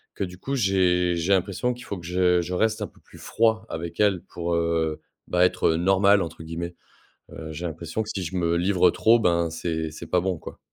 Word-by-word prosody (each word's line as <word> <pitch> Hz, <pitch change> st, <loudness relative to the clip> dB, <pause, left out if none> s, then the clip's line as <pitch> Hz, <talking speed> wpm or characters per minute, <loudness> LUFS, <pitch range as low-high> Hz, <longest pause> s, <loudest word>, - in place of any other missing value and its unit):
Que 100 Hz, -, -2 dB
du 90 Hz, 0 st, -10 dB
coup 135 Hz, +8 st, -3 dB
j'ai 90 Hz, -5 st, +2 dB
j'ai 85 Hz, +4 st, -1 dB
l'impression 100 Hz, +6 st, 0 dB
qu'il 125 Hz, -, -12 dB
faut 100 Hz, -, -5 dB
que 85 Hz, -, -10 dB
je 90 Hz, 0 st, +2 dB
je 90 Hz, +2 st, -5 dB
reste 110 Hz, +3 st, +1 dB
un -, -, -2 dB
peu -, -, -23 dB
plus -, -, -17 dB
froid 110 Hz, -1 st, +1 dB
avec 85 Hz, +2 st, -6 dB
elle, 100 Hz, -4 st, +3 dB
pour, 85 Hz, 0 st, -4 dB
heu, 80 Hz, -2 st, 0 dB, 0.3 s
bah 90 Hz, 0 st, +3 dB
être, -, -, +1 dB
heu, 80 Hz, -, +2 dB
«normal» 95 Hz, +3 st, +4 dB
entre 80 Hz, -1 st, -6 dB
guillemets. 85 Hz, +2 st, -5 dB, 0.6 s
Heu, 80 Hz, -1 st, -8 dB
j'ai 85 Hz, +3 st, -5 dB
l'impression 85 Hz, +6 st, -4 dB
que 110 Hz, -, -9 dB
si 95 Hz, -, -3 dB
je 95 Hz, +3 st, -5 dB
me 85 Hz, -1 st, +1 dB
livre 90 Hz, -1 st, +3 dB
trop, 115 Hz, +1 st, +4 dB
ben 85 Hz, -4 st, +2 dB
c'est 80 Hz, -1 st, -3 dB
c'est 80 Hz, -, -9 dB
pas 90 Hz, -, +2 dB
bon 95 Hz, -2 st, -1 dB
quoi. -, -, -10 dB
90 Hz, 230 wpm, -25 LUFS, 85-95 Hz, 0.6 s, normal